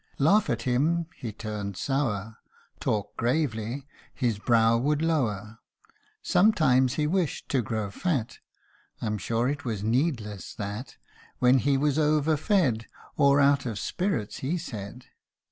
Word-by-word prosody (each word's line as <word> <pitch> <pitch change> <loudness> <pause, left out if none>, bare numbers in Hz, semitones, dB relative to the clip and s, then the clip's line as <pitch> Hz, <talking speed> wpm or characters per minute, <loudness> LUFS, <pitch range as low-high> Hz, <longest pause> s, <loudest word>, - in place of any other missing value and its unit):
Laugh 195 +9 +4
at 115 -1 -1
him 155 +7 +1
he 115 - -6
turned 105 -3 -5
sour; 110 -6 -1 0.4
Talk 105 -1 -2
gravely 120 -1 -1 0.3
his 115 -5 0
brow 115 0 +4
would 145 +5 +1
lower. 110 -10 -1 0.6
Sometimes 155 - +3
he 150 - 0
wished 175 0 -1
to 135 - +2
grow 110 -3 -3
fat, 140 - -2 0.6
(I'm 105 -1 -2
sure 115 +6 0
it 140 -1 -2
was 110 -5 -3
needless, 115 - -1
that) 105 +5 -6 0.4
When 125 +1 +5
he 135 +2 +2
was 145 +1 +1
over 155 0 +3
fed, 145 - +1 0.3
Or 140 -1 +4
out 140 -1 +3
of 110 -4 -3
spirits,, 175 - -2
he 150 +7 -2
said. 120 - -7
125 Hz, 135 wpm, -27 LUFS, 110-150 Hz, 0.6 s, When